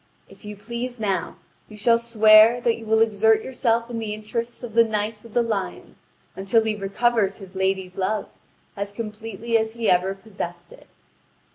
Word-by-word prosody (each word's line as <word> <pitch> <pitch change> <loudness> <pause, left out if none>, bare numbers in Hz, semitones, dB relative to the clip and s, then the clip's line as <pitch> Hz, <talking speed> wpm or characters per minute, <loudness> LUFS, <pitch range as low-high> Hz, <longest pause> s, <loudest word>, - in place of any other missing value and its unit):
If - - -18
you 210 0 -7
please 240 +4 -6
now, 195 -5 -2 0.3
you 215 - -12
shall 230 +2 +3
swear 220 0 +6
that 235 -1 +2
you 225 -1 -11
will 220 0 +3
exert 220 0 +2
yourself 235 -3 0
in 235 -1 -5
the 215 -2 -4
interests 230 +3 -5
of 235 -3 -7
the 230 0 +6
Knight 215 -1 -3
with 230 -1 -15
the 240 - +4
Lion 215 -4 -4 0.4
until 195 +4 +2
he 220 -1 -1
recover 210 +3 +1
his 195 -1 -11
lady's 190 -1 -1
love 200 +2 -1 0.5
as 200 0 -5
completely 225 +1 -3
as 220 0 -3
he 230 -2 0
ever 185 +2 +2
possessed 175 -4 -8
it." - - -16
220 Hz, 175 wpm, -23 LUFS, 200-230 Hz, 0.5 s, swear